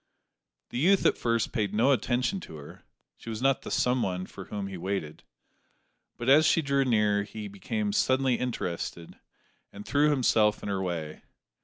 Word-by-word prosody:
The 120 Hz, -, -3 dB
youth 190 Hz, +6 st, +3 dB
at -, -, +4 dB
first 115 Hz, -2 st, 0 dB
paid 105 Hz, -5 st, -1 dB
no 120 Hz, +6 st, +4 dB
attention 130 Hz, -, 0 dB
to 80 Hz, -, -10 dB
her 75 Hz, -1 st, -12 dB, 0.3 s
(she -, -, -10 dB
was 110 Hz, -1 st, -4 dB
not 135 Hz, +1 st, +2 dB
the -, -, -8 dB
"someone" 95 Hz, -8 st, 0 dB
for 95 Hz, 0 st, -10 dB
whom 100 Hz, +1 st, -5 dB
he 95 Hz, -1 st, -6 dB
waited); 90 Hz, -4 st, -4 dB, 1.0 s
but 120 Hz, -, -5 dB
as 150 Hz, +4 st, +6 dB
she 165 Hz, -, +3 dB
drew 140 Hz, -1 st, +2 dB
near, 105 Hz, -5 st, +2 dB
he 105 Hz, +1 st, -7 dB
became 100 Hz, +1 st, -3 dB
suddenly 130 Hz, +3 st, +2 dB
interested, 90 Hz, -8 st, -4 dB, 0.5 s
and 100 Hz, +1 st, -10 dB
threw 145 Hz, +1 st, +3 dB
himself 115 Hz, -7 st, +2 dB
in -, -, -4 dB
her 95 Hz, -1 st, -1 dB
way. 85 Hz, -4 st, -4 dB
110 Hz, 170 wpm, -28 LUFS, 100-130 Hz, 1.0 s, as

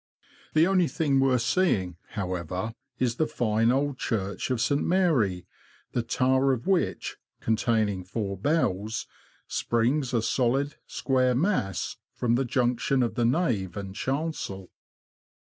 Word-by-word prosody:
The 155 Hz, +1 st, +6 dB
only 185 Hz, -2 st, +3 dB
thing 145 Hz, -5 st, +1 dB
worth 130 Hz, -3 st, +3 dB
seeing, 115 Hz, -, +1 dB, 0.2 s
however, 90 Hz, +1 st, -3 dB, 0.2 s
is 120 Hz, -2 st, 0 dB
the 155 Hz, -, +2 dB
fine 115 Hz, 0 st, +1 dB
old 140 Hz, 0 st, 0 dB
church 100 Hz, -2 st, -2 dB
of 125 Hz, -2 st, 0 dB
St. 140 Hz, +5 st, +2 dB
Mary, 140 Hz, -, +2 dB, 0.5 s
the 120 Hz, -, 0 dB
tower 130 Hz, +3 st, +2 dB
of 120 Hz, -2 st, -4 dB
which 190 Hz, -3 st, 0 dB, 0.2 s
(containing 110 Hz, -4 st, +1 dB
four 100 Hz, +2 st, -3 dB
bells) 110 Hz, -, 0 dB, 0.4 s
springs, 125 Hz, +4 st, 0 dB
a 115 Hz, -3 st, +1 dB
solid, 135 Hz, +4 st, +1 dB
square 130 Hz, -2 st, +1 dB
mass, 125 Hz, -, 0 dB, 0.2 s
from 120 Hz, -1 st, +1 dB
the 130 Hz, +3 st, +2 dB
junction 125 Hz, +1 st, +1 dB
of 115 Hz, -2 st, -1 dB
the 120 Hz, 0 st, +1 dB
nave 115 Hz, -, 0 dB
and 100 Hz, -1 st, -6 dB
chancel. 130 Hz, -, -3 dB
120 Hz, 130 wpm, -27 LUFS, 105-135 Hz, 0.5 s, The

